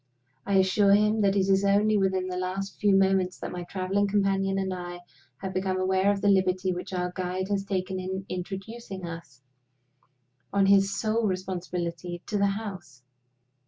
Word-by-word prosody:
I 200 - +1
assure 195 +1 +4
him 210 +1 +2
that 200 -1 +3
it 195 -1 +2
is 195 0 +3
only 205 +2 +3
within 190 -2 +1
the 180 - -4
last 185 +2 -4
few 205 -2 +4
moments 190 -1 +2
that - - -6
my 180 -1 -5
traveling 195 +2 0
companion 195 -1 +1
and 190 -1 -1
I 175 -1 -6 0.4
have 190 -1 -4
become 185 0 -1
aware 190 +1 +2
of 200 -1 -2
the 205 - +1
liberty 185 -1 +2
which 180 +2 -6
our 180 -1 -2
guide 185 +1 -3
has 200 -1 0
taken 190 -1 -2
in 190 +1 -4
introducing 195 +2 -6
us, 165 -6 -9 1.1
on 200 -1 +3
his 195 0 +6
own - - -4
sole 215 +2 0
responsibility, 180 -2 -4
to 210 - -2
the 200 - +4
house. 195 - -6
190 Hz, 175 wpm, -27 LUFS, 185-200 Hz, 1.1 s, his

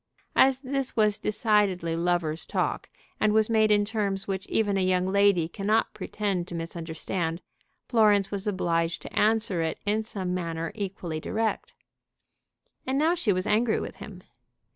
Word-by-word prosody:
As 265 0 +4
this 275 -1 -2
was 210 -2 +2
decidedly 210 -6 +1
lover's 170 -2 0
talk, - - -2 0.3
and 215 -1 +3
was 220 +1 +3
made 220 -1 +4
in 205 -1 +4
terms 200 -3 -1
which 195 0 -3
even 205 -3 +1
a 195 - +1
young 185 0 +2
lady 195 -3 +3
cannot 210 +5 0
pretend 200 -3 -3
to 175 - -6
misunderstand, 165 0 -4 0.5
Florence 210 -4 +3
was 200 +1 -3
obliged 170 -4 0
to - - -9
answer 215 -5 +2
it 160 -1 -2
in 210 +2 +1
some 190 -4 -4
manner 165 -2 -3
equally 185 -6 -4
direct. 220 +7 -2 1.1
And 265 +1 0
now 315 +4 +3
she 335 -12 +1
was 185 -1 0
angry 220 +1 +2
with - - -7
him. - - -10
200 Hz, 155 wpm, -27 LUFS, 175-215 Hz, 1.1 s, As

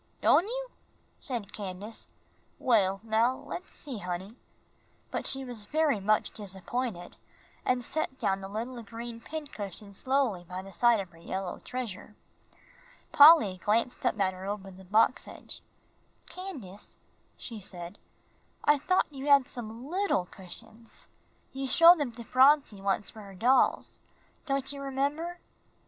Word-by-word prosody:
"Don' 360 - +5
you?" - - -4 0.5
said 235 -7 -4
Candace. 205 +2 -6 0.5
"Well, 195 -5 +2
now 225 +3 +2
let's 285 +6 -8
see, 265 -7 -3
honey," 185 +3 -5 0.8
but - - -2
she 270 0 0
was 235 -4 -5
very 300 -2 +2
much 210 +2 +2
disappointed, 200 0 -4 0.5
and 250 -1 0
set 310 -3 -2
down 195 -4 0
the 195 - -6
little 235 +5 -5
green 230 +1 -8
pincushion 215 - -7
slowly 255 -5 0
by 180 +2 -7
the 195 0 -11
side 235 +4 +4
of 190 -3 -5
her 165 - -17
yellow 190 +2 -4
treasure. 215 -4 -6 1.0
Polly 285 - +8
glanced 230 +4 +1
up 220 - +1
at 190 -1 +2
her 185 +1 -8
over 200 -1 -4
the 190 +1 -14
box 220 +6 +3
edge. - - -7 0.6
"Candace," 270 - -9 0.4
she 230 -3 -6
said, 180 -1 -7 0.6
"I 295 -1 +4
thought 370 +6 +2
you 275 +1 -6
had 280 -3 +6
some 235 +1 -6
little 365 - +1
cushions. 220 +5 -11 0.4
You 270 0 -3
showed 335 +5 +8
them 280 -5 -1
to 235 0 -9
Phronsie 260 -4 +4
once 195 +1 0
for 220 - -11
her 200 -2 -11
dolls, 250 +7 +2 0.5
don't 275 0 0
you 280 - -7
remember?" 285 +6 -2
230 Hz, 140 wpm, -29 LUFS, 195-275 Hz, 1.0 s, Polly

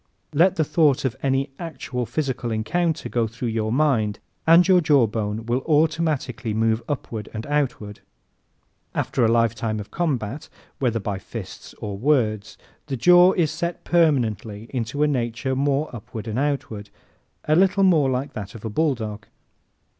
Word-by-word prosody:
Let 175 +5 +4
the 160 - +2
thought 150 -3 +2
of 130 - -1
any 135 +1 0
actual 130 -7 -4
physical 130 -5 -2
encounter 160 +10 -1
go 115 -2 0
through 120 +2 -4
your 110 -1 -1
mind 120 -7 +1 0.3
and 170 +3 +7
your 185 -2 +5
jaw 145 -6 +4
bone 110 0 -3
will 120 +2 0
automatically 150 -7 0
move 110 0 +1
upward 115 -6 -4
and 110 - -4
outward. 135 -8 -2 1.0
After 125 - 0
a - - +5
lifetime 115 -1 +1
of 105 - -9
combat, 140 -6 -2 0.3
whether 120 -4 0
by 100 -1 -3
fists 100 0 -9
or 100 -2 -6
words, 110 -6 +1 0.3
the 135 - -3
jaw 180 +7 +6
sets 170 +3 -3
permanently 115 - +1
a 130 - 0
little 130 0 -1
more 140 +1 0
upward 110 0 -8
and 110 +3 -2
outward 135 -8 -2 0.5
a 155 - +2
little 195 +2 +4
more 160 -8 +4
like 130 +2 -2
that 100 -2 -7
of 115 - -9
the 110 - -5
bulldog. 110 -8 -1
125 Hz, 150 wpm, -23 LUFS, 110-150 Hz, 1.0 s, and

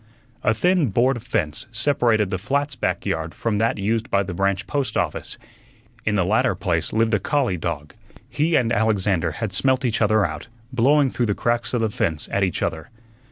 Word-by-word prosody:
A 105 - +2
thin 180 - +2
board 120 +4 +1
fence 80 - -3
separated 115 -4 +2
the 95 - -1
flat's 140 +7 -1
back 120 - -2
yard 80 0 -2
from 110 -3 -1
that 115 0 +1
used 110 +4 -1
by 100 0 +2
the 90 -1 -5
branch 100 +2 0
post 135 -7 -2
office. - - -2 0.7
In 110 - +1
the 90 -3 +2
latter 100 0 +2
place 85 -4 -1
lived 115 0 +1
a 105 - +3
collie 135 -5 0
dog. 75 -3 -4 0.3
He 160 +2 0
and 115 -2 +2
Alexander 100 -6 +1
had 110 +1 -4
smelt 130 +6 +2
each 115 -2 0
other 110 -1 +3
out, 80 +2 -5 0.3
blowing 135 +3 +3
through 120 - 0
the 105 - 0
cracks 120 0 0
of 120 - 0
the 110 -2 0
fence 80 -6 -1
at 100 - 0
each 95 -3 -1
other. 80 +7 -3
110 Hz, 195 wpm, -22 LUFS, 95-125 Hz, 0.7 s, a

